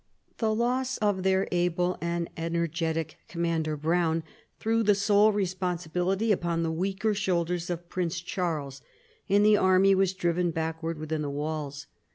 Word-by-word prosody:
The 220 Hz, -2 st, +1 dB
loss 250 Hz, +3 st, 0 dB
of 205 Hz, -3 st, +1 dB
their 190 Hz, +1 st, +2 dB
able 175 Hz, 0 st, +1 dB
and 170 Hz, 0 st, -1 dB
energetic 165 Hz, -1 st, -2 dB
commander, 165 Hz, -2 st, -1 dB
Browne, 165 Hz, +1 st, +1 dB, 0.4 s
threw 225 Hz, +1 st, +1 dB
the 210 Hz, -2 st, +4 dB
sole 205 Hz, +1 st, +4 dB
re 205 Hz, -2 st, +1 dB
sponsibility 180 Hz, +3 st, -1 dB
upon 170 Hz, -3 st, 0 dB
the 165 Hz, -, 0 dB
weaker 195 Hz, +6 st, 0 dB
shoulders 180 Hz, -3 st, -1 dB
of 175 Hz, 0 st, -4 dB
Prince 170 Hz, -1 st, -2 dB
Charles, 155 Hz, -6 st, -3 dB, 0.5 s
and 205 Hz, +1 st, +4 dB
the 210 Hz, 0 st, +6 dB
army 190 Hz, +1 st, +5 dB
was 190 Hz, -1 st, +2 dB
driven 175 Hz, -1 st, +1 dB
backward 160 Hz, 0 st, -3 dB
within 155 Hz, 0 st, -3 dB
the 145 Hz, -, -2 dB
walls. 145 Hz, -1 st, -4 dB
175 Hz, 150 wpm, -28 LUFS, 165-195 Hz, 0.5 s, the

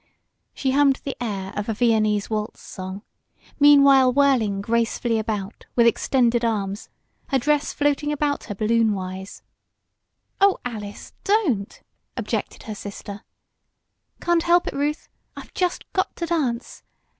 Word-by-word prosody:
She 265 Hz, -, 0 dB
hummed 275 Hz, 0 st, +3 dB
the 275 Hz, -, -4 dB
air 195 Hz, -5 st, -4 dB
of 205 Hz, +2 st, -3 dB
a 220 Hz, -, -1 dB
Viennese 215 Hz, -3 st, +2 dB
waltz 215 Hz, -1 st, -3 dB
song, 190 Hz, +2 st, -7 dB, 0.6 s
meanwhile 280 Hz, -3 st, +7 dB
whirling 250 Hz, -7 st, +2 dB
gracefully 230 Hz, +1 st, 0 dB
about 210 Hz, -2 st, -4 dB
with 235 Hz, -, +5 dB
extended 240 Hz, 0 st, +2 dB
arms, 205 Hz, -3 st, -2 dB, 0.4 s
her 270 Hz, -, +2 dB
dress 290 Hz, +2 st, +1 dB
floating 290 Hz, 0 st, 0 dB
about 295 Hz, -1 st, -1 dB
her 205 Hz, -, -6 dB
balloonwise. 200 Hz, -3 st, -1 dB, 1.0 s
"Oh, 395 Hz, -1 st, +5 dB
Alice! 210 Hz, -4 st, -7 dB
Don't!" 335 Hz, -, 0 dB, 0.3 s
objected -, -, -3 dB
her 220 Hz, -, -6 dB
sister. 205 Hz, 0 st, -8 dB, 1.0 s
"Can't 345 Hz, -1 st, +2 dB
help 345 Hz, +1 st, +3 dB
it, -, -, -2 dB
Ruth. 295 Hz, +2 st, -2 dB, 0.3 s
I've -, -, -10 dB
just 360 Hz, -1 st, -1 dB
got 375 Hz, -, -1 dB
to 340 Hz, -, -3 dB
dance. 275 Hz, -8 st, -2 dB
235 Hz, 130 wpm, -23 LUFS, 210-285 Hz, 1.0 s, meanwhile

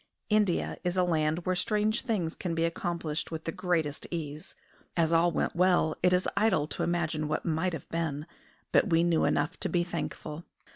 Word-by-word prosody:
India 210 Hz, -4 st, +2 dB
is 180 Hz, +1 st, -1 dB
a 180 Hz, -, +4 dB
land 160 Hz, -1 st, +1 dB
where 185 Hz, -, +1 dB
strange 215 Hz, +4 st, +1 dB
things 195 Hz, -10 st, -1 dB
can 170 Hz, -3 st, -3 dB
be 165 Hz, 0 st, +2 dB
accomplished 170 Hz, -2 st, -2 dB
with 160 Hz, -1 st, -5 dB
the 165 Hz, -, -2 dB
greatest 160 Hz, -5 st, -1 dB
ease. 155 Hz, -3 st, -6 dB, 0.4 s
As 165 Hz, -1 st, +3 dB
all 170 Hz, +1 st, +4 dB
went -, -, -1 dB
well 175 Hz, -3 st, +3 dB
it 180 Hz, -, +4 dB
is 180 Hz, 0 st, +2 dB
idle 200 Hz, -7 st, +3 dB
to -, -, -4 dB
imagine 160 Hz, -3 st, 0 dB
what 155 Hz, -, -2 dB
might 165 Hz, +2 st, 0 dB
have 160 Hz, -, -6 dB
been; 155 Hz, -3 st, -2 dB, 0.5 s
but 210 Hz, -, +4 dB
we 165 Hz, -1 st, +4 dB
knew 170 Hz, -2 st, +3 dB
enough 145 Hz, +5 st, 0 dB
to 190 Hz, -, 0 dB
be 175 Hz, +1 st, +2 dB
thankful. 165 Hz, -2 st, -5 dB
170 Hz, 190 wpm, -29 LUFS, 160-180 Hz, 0.5 s, a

